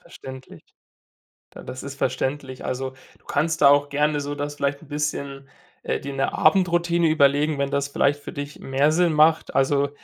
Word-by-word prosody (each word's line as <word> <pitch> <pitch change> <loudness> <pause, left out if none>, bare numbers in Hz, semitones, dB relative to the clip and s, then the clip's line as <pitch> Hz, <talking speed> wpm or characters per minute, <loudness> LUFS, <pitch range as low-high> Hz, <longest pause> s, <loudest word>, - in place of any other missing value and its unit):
Verständlich. 130 0 -11 0.9
Da - - -12
das 130 - -8
ist 140 0 -7
verständlich. 130 +1 -3
Also, 130 +1 -3 0.3
du - - -32
kannst 160 +2 -1
da 140 - +8
auch 145 0 +4
gerne 150 +1 +1
so 145 +1 -4
das 145 0 -4
vielleicht 140 0 -2
'n 160 - -15
bisschen 140 -2 -4 0.3
äh - - -1
dir 140 0 -6
'ne 135 0 -1
Abendroutine 170 -1 +2
überlegen, 145 0 +3
wenn 140 0 -1
das 140 0 -1
vielleicht 145 +1 +1
für - - -8
dich 145 +1 -7
mehr 140 +3 +1
Sinn 170 0 +2
macht, 155 +1 +3
also 140 +1 +2
145 Hz, 180 wpm, -23 LUFS, 140-150 Hz, 0.9 s, da